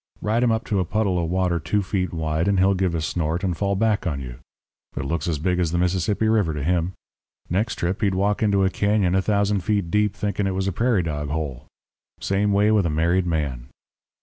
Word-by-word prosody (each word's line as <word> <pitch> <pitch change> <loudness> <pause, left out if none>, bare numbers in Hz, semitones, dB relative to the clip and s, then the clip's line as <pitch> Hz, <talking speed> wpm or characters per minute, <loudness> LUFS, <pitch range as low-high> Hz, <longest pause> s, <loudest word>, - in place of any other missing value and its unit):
Ride 110 +3 0
him 120 - +3
up 110 +1 0
to 100 - 0
a - - +2
puddle 95 -2 0
of 80 - -2
water 90 -1 +1
two 85 +6 0
feet 95 -3 -2
wide, 80 +1 -1
and 100 -1 +2
he'll 95 +1 +4
give 90 -2 0
a 80 - -1
snort 80 +2 -2
and 90 -3 0
fall 100 +3 0
back 105 -1 +1
on 70 -5 -2
you. - - -8 0.6
It - - -2
looks 80 +3 -2
as 80 -3 0
big 90 +4 0
as 85 -3 0
the 85 - 0
Mississippi 95 +4 +1
River 105 -8 +2
to 70 - -3
him. 85 +2 0 0.6
Next 105 +7 0
trip 90 +4 -2
he'd 100 -3 +1
walk 100 +2 +1
into 100 -3 +3
a 95 - +1
cañon 100 -3 +1
a 95 - +3
thousand 100 0 +1
feet 100 -3 0
deep 105 0 +1
thinking 100 -1 -1
it 95 - -2
was 95 0 -1
a - - +1
prairie 115 0 +1
dog 75 -3 -3
hole. 75 -5 -4 0.5
Same 100 +1 0
way 105 +2 +3
with 105 -5 +3
a - - -1
married 85 +4 +1
man. 70 -7 -2
95 Hz, 230 wpm, -23 LUFS, 85-100 Hz, 0.6 s, he'll